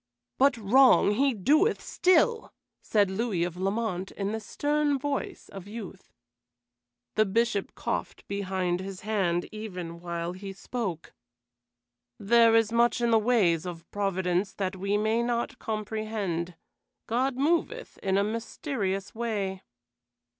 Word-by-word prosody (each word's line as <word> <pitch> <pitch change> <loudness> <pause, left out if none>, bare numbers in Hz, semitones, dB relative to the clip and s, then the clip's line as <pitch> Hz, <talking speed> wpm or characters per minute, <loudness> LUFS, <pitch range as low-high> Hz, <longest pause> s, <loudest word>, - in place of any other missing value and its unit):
"But 275 -1 +4
wrong 235 +1 +5
he 270 +6 +3
doeth 305 - +3
still," 370 +6 +2 0.3
said 205 -3 +2
Louis 195 -4 0
of 175 -1 -3
Lamont, 195 0 -2
in 200 0 -3
the 220 - -2
stern 290 +5 0
voice 280 +1 -4
of 195 -1 -9
youth. 210 -3 -9 1.0
The 215 - +3
Bishop 220 0 0
coughed - - -4
behind 185 -3 -1
his 190 0 -7
hand 185 -5 0
even 180 -6 -6
while 170 0 -4
he 195 +1 -7
spoke. 195 -5 -5 1.0
"There 230 +2 +5
is 225 -1 +3
much 235 +1 +3
in 235 -1 +1
the 225 - +6
ways 190 -8 +2
of 170 -1 -7
Providence 190 -1 0
that 190 -1 -2
we 200 +2 0
may 220 +2 +1
not 240 +3 -2
comprehend. 215 -5 -3 0.5
God 255 +3 0
moveth 340 - -1
in 190 0 0
a 200 - +3
mysterious 215 -2 -3
way." 205 -5 -2
210 Hz, 130 wpm, -28 LUFS, 190-235 Hz, 1.0 s, the